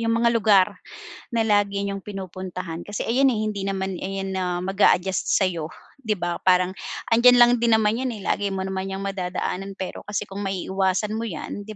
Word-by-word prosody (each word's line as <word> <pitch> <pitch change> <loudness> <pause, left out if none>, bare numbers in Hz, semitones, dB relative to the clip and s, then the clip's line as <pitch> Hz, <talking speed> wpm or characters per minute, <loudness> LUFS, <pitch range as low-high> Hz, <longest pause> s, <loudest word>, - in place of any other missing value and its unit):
'yong 230 0 +1
mga 235 - +5
lugar 210 -4 +5 0.7
na 225 - +3
lagi 205 -2 +1
niyong 200 0 -3
pinupuntahan. 185 -3 -6
Kasi 205 - -3
ayan, 265 +4 +3
eh, 215 -2 -1
hindi 210 -2 -3
naman 190 0 -2
ayan 195 0 -4
na 190 -1 -1 0.2
mag-a-adjust 190 -1 +2
sa - - +2
'yo, 170 -4 -1 0.3
'di 220 -5 -1
ba? 175 -1 -3
Parang 180 0 +4 0.4
andiyan 245 +2 +7
lang 240 0 +8
din 230 -1 +4
naman 220 +2 +2
'yan, 260 -1 -1
eh, 205 - -9
lagi 205 - 0
mo 190 -1 -2
naman 190 0 -3
'yang 195 +1 -4
madadaanan. 195 0 -3
Pero 190 - -6
kasi 205 0 -2
kung 195 +1 -7
maiiwasan 190 +2 -1
mo 225 - -2
'yan, 190 +3 -6
'di 215 - -7
195 Hz, 195 wpm, -24 LUFS, 190-215 Hz, 0.7 s, lang